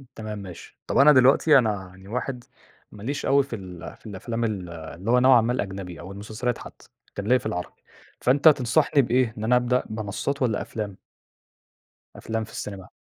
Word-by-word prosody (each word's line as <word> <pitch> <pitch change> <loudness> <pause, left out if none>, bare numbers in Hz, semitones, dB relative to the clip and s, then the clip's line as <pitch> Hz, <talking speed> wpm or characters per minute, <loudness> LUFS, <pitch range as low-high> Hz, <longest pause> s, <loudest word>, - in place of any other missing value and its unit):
تمام 110 -1 -6
ماشي، 95 -4 -11
طب - - -1
أنا 140 +2 +8
دلوقتي 135 +4 +6
أنا 105 -6 0
يعني 95 +1 -16
واحد، 125 +2 -4 0.5
ماليش 115 +8 -5
أوي 140 +1 +4
في 135 -3 -6
ال 90 -4 -9
في - - -28
الأفلام 115 +3 -4
ال 100 -6 -2
اللي 85 +5 -5
هو 125 - +5
نوعًا 130 -1 +6
ما 115 +2 0
الأجنبي 95 -6 -5
أو 85 +3 -9
المسلسلات 110 +4 -3
حتّى، - - -13 0.3
كان 100 0 -4
ليَّ 125 +2 +4
في - - -16
العربي، 90 0 -5 0.4
فأنت 140 +5 +4
تنصحني 145 +1 +4
بإيه، 125 -2 +1
إن 105 - -5
أنا 120 +3 +3
أبدأ 125 +1 +2
منصات 110 +6 -3
والّا 115 -5 +1
أفلام؟ 105 -4 -5 1.2
أفلام 110 0 -3
في - - -16
السينما؟ 95 -2 -7
110 Hz, 180 wpm, -25 LUFS, 100-125 Hz, 1.2 s, أنا